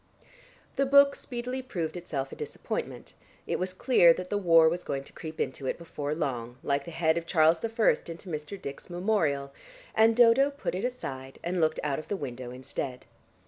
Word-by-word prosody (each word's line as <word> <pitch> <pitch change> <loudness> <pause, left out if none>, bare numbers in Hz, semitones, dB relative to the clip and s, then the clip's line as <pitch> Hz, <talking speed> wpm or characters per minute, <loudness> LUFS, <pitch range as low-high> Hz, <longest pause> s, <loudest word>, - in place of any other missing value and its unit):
The 275 - +2
book 280 0 +6
speedily 250 +1 -5
proved 175 -11 -4
itself 140 -6 -4
a - - -7
disappointment; - - -5 0.3
it - - -2
was 185 +1 -1
clear 185 -4 +5
that 185 0 -7
the 205 - +1
war 165 -4 +6
was 175 +2 0
going 135 -1 -3
to - - -14
creep 160 -1 -8
into 130 0 -2
it - - -1
before 150 -3 -4
long, 125 -6 -3
like 140 0 0
the - - -7
head 160 0 +1
of 170 - -13
Charles 160 -1 +4
I. - - +1 0.4
into 170 +3 -8
Mr. 155 +4 -5
Dick's 140 +4 -8
Memorial, 165 -7 0 0.4
and 225 +1 +5
Dodo 240 +4 +6
put 285 - -4
it 190 +6 -2
aside 135 - -5
and 175 +1 -1
looked 155 0 +2
out 145 -1 -1
of 155 - -9
the 205 - -2
window 125 -5 -6
instead. 130 0 -5
165 Hz, 190 wpm, -28 LUFS, 140-205 Hz, 0.4 s, book